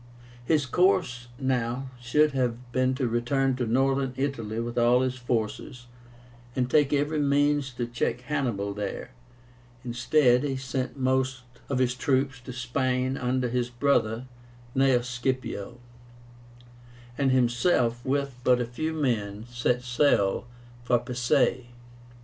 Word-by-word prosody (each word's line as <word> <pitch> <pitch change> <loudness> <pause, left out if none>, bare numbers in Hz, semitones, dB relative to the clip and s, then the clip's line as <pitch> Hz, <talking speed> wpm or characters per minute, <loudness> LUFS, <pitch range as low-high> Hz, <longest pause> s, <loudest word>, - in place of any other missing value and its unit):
His 150 +2 +2
course 145 -5 +1
now 130 -1 -1
should 150 +5 +3
have 125 -2 -2
been 130 +1 +1
to 130 -2 -1
return 125 +3 +1
to 125 -2 -1
Northern 135 +2 +1
Italy 115 -6 -2
with 120 0 -4
all 120 +1 +4
his 130 -1 0
forces, 120 +1 -3 0.7
and 125 -1 +1
take 145 -2 +4
every 145 +2 +1
means 145 -1 +2
to 120 -1 -3
check 120 0 -2
Hannibal 120 -8 -2
there. 105 +4 -5 0.7
Instead, 125 +2 +3
he 140 -2 -1
sent 130 0 -4
most 130 -1 0 0.3
of 140 - 0
his 125 -1 +2
troops 135 0 0
to 125 - -8
Spain 125 +1 -1
under 125 0 0
his 120 0 -1
brother 120 -2 +1 0.5
Gnaeus 130 -2 +3
Scipio, 125 -3 -3 1.4
and 135 +1 +1
himself, 120 -1 +2
with 140 -2 -1
but 125 -1 +4
a 120 - 0
few 155 +7 -3
men, 110 -8 -1
set 120 0 0
sail 120 -5 +2 0.4
for 120 0 +3
Pisae. 120 0 +1
125 Hz, 130 wpm, -27 LUFS, 120-135 Hz, 1.4 s, all